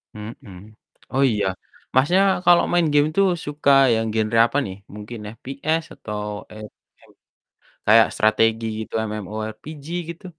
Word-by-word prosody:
Mhm. 105 -2 -11 0.4
Oh, 135 +1 +2
iya, 105 -2 -1 0.5
Masnya 145 +9 +4 0.3
kalo 175 -1 +6
main 175 -2 +3
game 145 0 +4
tuh 195 - +5 0.2
suka 145 -1 +1 0.2
yang 115 0 0
genre 110 +1 0
apa 120 - -3
nih? 95 -2 -6 0.2
Mungkin 105 +2 -8 0.2
FPS 150 +6 -2
atau 105 -1 -6 0.3
e - - -12 0.5
m - - -22 0.7
kayak 110 +1 +6
strategi 115 +1 +2
gitu, 110 - -8 0.2
MMORPG, 110 - -7 0.2
gitu? 170 +2 -9
115 Hz, 135 wpm, -22 LUFS, 110-145 Hz, 0.7 s, kalo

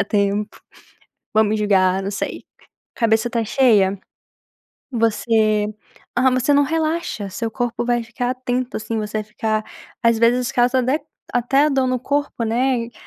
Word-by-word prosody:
a 200 - +2
tempo, 205 +1 -1 0.7
vão 220 - +5
me 215 +1 0
julgar", 195 -2 +2
não 195 - -3
sei. 200 - -4 0.5
Cabeça 225 -1 +2
está 230 -1 -1
cheia. 205 -6 +3 0.9
Você, 220 -2 +2 0.5
ah, 260 +1 +4
mas 255 -1 0
você 290 - +4
não 285 - +5
relaxa, 320 - -2
seu 225 +4 -3
corpo 240 +1 -2
vai 240 0 +1
ficar 245 +2 -3
atento 255 0 -2
assim, 225 +1 -3
você 215 0 -3
vai 215 - -3
ficar, 215 0 -2 0.4
às 230 -1 +3
vezes 245 +3 +2
causa 245 +1 +3
até 260 +5 0 0.3
até 270 +5 +3
dor 265 -2 +1
no 255 0 0
corpo, 285 -3 -1
né, 245 +3 +1
e 240 - -14
230 Hz, 160 wpm, -20 LUFS, 215-255 Hz, 0.9 s, vão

